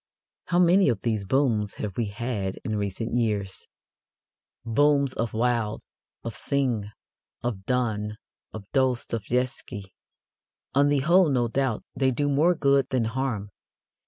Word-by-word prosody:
How 175 - 0
many 180 0 +5
of 120 - -1
these 110 -4 0
booms 110 -3 +1
have 100 -3 -5
we 115 - -1
had 105 -2 -3
in 110 -3 -1
recent 105 +3 -3
years 105 -5 -1 1.0
booms 140 +3 +3
of 115 0 -2
Wilde, 115 -2 0 0.4
of 115 -2 -5
Synge, 125 -4 -1 0.6
of 105 -6 -3
Donne, 110 -4 -1 0.3
of 110 - -7
Dostoevsky! 125 -5 -1 0.8
On 140 +1 +4
the 145 -2 +2
whole, 170 +3 +5
no 125 -4 +2
doubt, 130 -2 -1
they 135 -1 +2
do 145 +3 0
more 155 +6 +3
good 140 -3 +2
than 125 -3 +1
harm. 115 -4 -2
120 Hz, 130 wpm, -26 LUFS, 105-140 Hz, 1.0 s, many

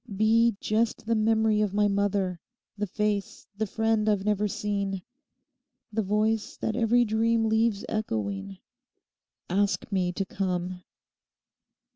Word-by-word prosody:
Be 225 +1 +4
just 220 +1 0
the 230 - +1
memory 220 -1 +2
of 205 -2 0
my 210 0 +4
mother, 200 -3 0 0.4
the 210 0 -2
face, 210 0 -2
the 215 +1 -1
friend 220 +1 +1
I've 205 -2 +1
never 210 0 +1
seen; 200 -2 -2 0.9
the 220 - +1
voice 215 +2 0
that 220 - -2
every 240 +1 +3
dream 225 +1 +2
leaves 220 -1 +1
echoing. 100 - -3 0.9
Ask 200 +3 0
me 185 -2 +1
to 195 - -2
come. 180 -1 -3
210 Hz, 125 wpm, -27 LUFS, 195-220 Hz, 0.9 s, Be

